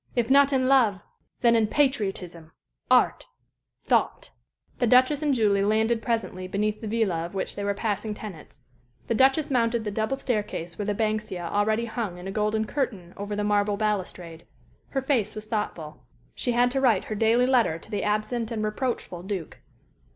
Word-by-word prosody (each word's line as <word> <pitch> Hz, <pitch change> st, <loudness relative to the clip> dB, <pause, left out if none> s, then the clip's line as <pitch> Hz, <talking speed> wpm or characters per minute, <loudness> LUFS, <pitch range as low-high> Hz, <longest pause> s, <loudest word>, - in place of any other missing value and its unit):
If 240 Hz, 0 st, 0 dB
not 280 Hz, +1 st, +6 dB
in 260 Hz, -2 st, +2 dB
love, 240 Hz, -8 st, +4 dB, 0.4 s
then 235 Hz, -1 st, +5 dB
in 225 Hz, -2 st, +3 dB
patriotism 195 Hz, -, -1 dB, 0.4 s
art -, -, +3 dB, 0.6 s
thought." -, -, +1 dB, 0.5 s
The 245 Hz, -, +2 dB
Duchess 255 Hz, +5 st, +4 dB
and 300 Hz, -1 st, +1 dB
Julie 210 Hz, -6 st, +2 dB
landed 220 Hz, +2 st, +2 dB
presently 225 Hz, -6 st, -2 dB
beneath 210 Hz, +2 st, -1 dB
the 220 Hz, -, -5 dB
villa 205 Hz, -7 st, 0 dB
of 175 Hz, +3 st, -7 dB
which 190 Hz, -, -3 dB
they 205 Hz, -, -4 dB
were 200 Hz, 0 st, 0 dB
the -, -, -13 dB
passing 210 Hz, -1 st, -2 dB
tenants. 200 Hz, -8 st, -10 dB, 0.4 s
The -, -, -1 dB
Duchess 270 Hz, +5 st, +3 dB
mounted 235 Hz, -2 st, +1 dB
the 210 Hz, -, -3 dB
double 220 Hz, +6 st, -1 dB
staircase 210 Hz, -9 st, -3 dB
where 205 Hz, -, -2 dB
the 205 Hz, -, 0 dB
banksia 215 Hz, -4 st, -2 dB
already 215 Hz, +5 st, +1 dB
hung 220 Hz, -6 st, -4 dB
in 180 Hz, +1 st, -8 dB
a -, -, -4 dB
golden 215 Hz, +1 st, 0 dB
curtain 210 Hz, -10 st, -3 dB
over 205 Hz, +1 st, -4 dB
the 210 Hz, -, -1 dB
marble 205 Hz, 0 st, +1 dB
balustrade. 185 Hz, -6 st, -3 dB, 0.4 s
Her 270 Hz, -1 st, -2 dB
face 230 Hz, -6 st, 0 dB
was 215 Hz, 0 st, -7 dB
thoughtful. 210 Hz, -8 st, -4 dB, 0.3 s
She 245 Hz, -, -1 dB
had 245 Hz, +1 st, +3 dB
to 270 Hz, +1 st, 0 dB
write 230 Hz, -8 st, +3 dB
her -, -, -5 dB
daily 225 Hz, +3 st, +3 dB
letter 245 Hz, -11 st, +2 dB
to 190 Hz, -, -14 dB
the 205 Hz, -2 st, -1 dB
absent 215 Hz, +2 st, -1 dB
and 220 Hz, -3 st, -3 dB
reproachful 215 Hz, -5 st, -3 dB
Duke. 185 Hz, -3 st, -5 dB
215 Hz, 180 wpm, -26 LUFS, 200-240 Hz, 0.6 s, not